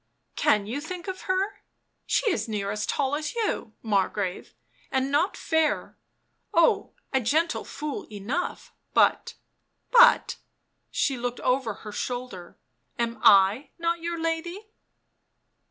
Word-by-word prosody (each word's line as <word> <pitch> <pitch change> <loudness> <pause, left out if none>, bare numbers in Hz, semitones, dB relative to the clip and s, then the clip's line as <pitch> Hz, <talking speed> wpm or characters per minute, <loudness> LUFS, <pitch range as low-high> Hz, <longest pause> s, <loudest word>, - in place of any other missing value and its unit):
" - - -48
Can 210 -2 +4
you 245 +7 -4
think 355 +4 -7
of 375 -1 -5
her? 375 +2 0 0.5
She 455 - +2
is 360 - -1
near 205 -2 -2
as 210 0 -3
tall 275 -1 0
as 300 +4 -4
you, 430 - -2
Margrave, 195 -3 -1 0.4
and 265 0 0
not 330 +7 +1
fair 320 -1 0 0.3
— - - -47
oh, 335 -1 +3 0.2
a 265 - +3
gentle 315 +8 +1
fool 295 0 -5
enough 215 - -4
— - - -48
but - - +3 0.3
— - - -48
but - - +6 0.2
" - - -50
— - - -49
she 270 -2 0
looked 245 0 -3
over 250 -4 0
her 210 - -6
shoulder 245 -5 -5
— 120 -2 -49
" - - -45
am 235 -1 -2
1 200 +8 +5
not 335 0 -1
your 340 0 -3
lady?" 345 +6 -3
275 Hz, 155 wpm, -26 LUFS, 215-335 Hz, 0.5 s, but